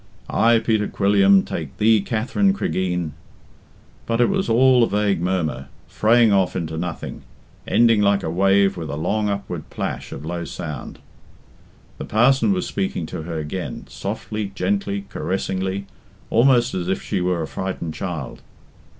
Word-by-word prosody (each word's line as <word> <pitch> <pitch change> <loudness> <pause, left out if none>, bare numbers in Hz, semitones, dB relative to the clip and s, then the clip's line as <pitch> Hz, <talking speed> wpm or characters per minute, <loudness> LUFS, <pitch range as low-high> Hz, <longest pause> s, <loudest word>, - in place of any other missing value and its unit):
"I, 115 +1 +4
Peter 110 -2 +1
Quilliam, 100 -1 +4
take 80 -5 -6
thee, 110 0 +4
Katherine 125 - +1
Cregeen 90 - -1 0.5
'" - - -30
But 115 0 0
it 120 - +4
was 195 -5 0
all 125 +2 +5
a 115 - +4
vague 100 -3 +1
murmur, 80 -7 -1 0.2
fraying 115 0 +4
off 95 -2 +2
into 80 -2 -3
nothing, 85 +1 -5 0.5
ending 115 -3 +4
like 100 -1 +2
a - - -2
wave 95 +2 +3
with 80 -3 -5
a 75 - -3
long 105 +7 0
upward 100 0 -4
plash - - -4
of 70 - -7
low 85 +1 -3
sound. 75 -5 -6 1.0
The - - -4
parson 135 - +3
was 185 -2 0
speaking 190 - -2
to - - -3
her 80 +1 -5
again, 80 +4 -5
softly, 105 -2 -4
gently, 100 +1 -1
caressingly, 95 0 -2 0.5
almost 120 +1 +4
as 90 -1 -2
if 95 - 0
she 100 -4 -2
were 90 -2 0
a - - -4
frightened 90 -4 -4
child. 80 -6 -5
100 Hz, 155 wpm, -22 LUFS, 90-110 Hz, 1.0 s, all